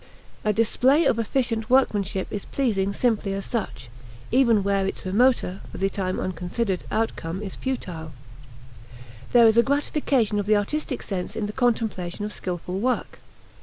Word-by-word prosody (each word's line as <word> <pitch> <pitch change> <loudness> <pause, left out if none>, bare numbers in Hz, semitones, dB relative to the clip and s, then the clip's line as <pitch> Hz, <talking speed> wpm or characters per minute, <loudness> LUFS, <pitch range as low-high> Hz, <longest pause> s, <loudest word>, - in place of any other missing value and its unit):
A 215 - +2
display 250 +8 +3
of 230 - +2
efficient 230 -1 -1
workmanship 205 -7 +2
is 205 - -4
pleasing 205 -8 0
simply 210 -2 0
as 195 - -4
such, 225 - -4 0.4
even 235 -5 +4
where 195 -1 +1
its - - -5
remoter, 200 -1 +2
for - - -8
the 195 +1 0
time 185 -2 -2
unconsidered, 185 +3 -2
outcome 190 -4 -2
is 195 - -6
futile. 180 -12 -4 1.2
There 240 -1 +7
is 220 0 +5
a - - +9
gratification 270 -5 +1
of 205 - -3
the 215 0 +5
artistic 260 +5 -2
sense 185 -3 -4
in 215 - -2
the 210 - -5
contemplation 220 -6 -1
of 210 - -5
skillful 180 +1 -4
work. 250 +4 -1
210 Hz, 155 wpm, -24 LUFS, 190-240 Hz, 1.2 s, a